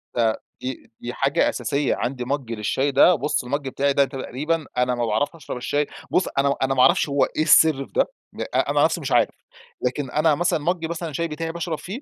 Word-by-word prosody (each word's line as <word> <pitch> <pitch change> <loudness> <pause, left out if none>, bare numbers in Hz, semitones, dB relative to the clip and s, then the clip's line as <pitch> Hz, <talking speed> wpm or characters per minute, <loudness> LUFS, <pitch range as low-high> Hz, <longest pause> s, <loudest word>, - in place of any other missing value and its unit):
ده 115 -2 +1 0.2
دي 130 0 -6
دي 120 +1 -5
حاجة 135 +2 +2
أساسية، 135 +4 -1
عندي 125 -1 -3
مج 135 -2 -3
للشاي 115 +6 0
ده، 155 +6 +6
بُص 150 -3 -1
المج 140 +2 -3
بتاعي 140 +1 0
ده 140 0 +4
تقريبًا، 150 +4 -3
أنا 125 0 +2
ما 120 -1 -1
باعرفش 140 +9 0
أشرب 150 -5 -7
الشاي 145 +4 -1 0.2
بُص 185 - +2
أنا 140 0 +3
أنا 135 0 +2
ما 130 - +2
أعرفش 170 0 +4
هو 140 0 +2
إيه - - -3
السر 155 -3 +5
في - - -23
ده، - - +3 0.5
أنا - - +2
نَفسي - - +1
مش - - -4
عارف. - - +4 0.5
لكن 125 +1 -2
أنا 155 +1 +3
مثلًا 175 -1 +1
مج 170 +2 -1
مثلًا 170 -1 -4
الشاي 170 +3 -2
بتاعي 165 +1 -4
باشرب 170 -1 -3
فيه، 210 +9 -7
140 Hz, 210 wpm, -23 LUFS, 130-160 Hz, 0.5 s, ده